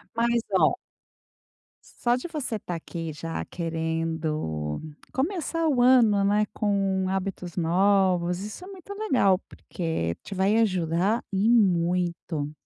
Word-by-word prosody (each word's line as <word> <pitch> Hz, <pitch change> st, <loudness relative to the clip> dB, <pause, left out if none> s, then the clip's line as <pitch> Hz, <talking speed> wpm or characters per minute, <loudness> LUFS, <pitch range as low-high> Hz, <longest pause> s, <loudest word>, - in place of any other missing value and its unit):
Mas, 235 Hz, 0 st, +2 dB
oh -, -, +4 dB, 1.3 s
só 240 Hz, 0 st, +4 dB
de 255 Hz, +7 st, -5 dB
você 290 Hz, -9 st, -3 dB
tá 180 Hz, -, -6 dB
aqui, 165 Hz, -1 st, -5 dB
já 165 Hz, +2 st, -5 dB
querendo 160 Hz, -, -2 dB, 0.3 s
começar 330 Hz, +2 st, -1 dB
o 255 Hz, -5 st, +3 dB
ano, 230 Hz, -6 st, +5 dB
né, 210 Hz, +1 st, +2 dB
com 195 Hz, -2 st, 0 dB
hábitos 190 Hz, -2 st, -3 dB
novos, 180 Hz, 0 st, +2 dB
isso 210 Hz, -, -7 dB
é -, -, -11 dB
muito 390 Hz, -1 st, -11 dB
legal, 260 Hz, -, +3 dB
porque 160 Hz, -, -3 dB
te -, -, -7 dB
vai 195 Hz, +3 st, +2 dB
ajudar 185 Hz, 0 st, +1 dB
e 195 Hz, +2 st, +1 dB
muito. 175 Hz, -7 st, +1 dB
190 Hz, 125 wpm, -26 LUFS, 165-230 Hz, 1.3 s, ano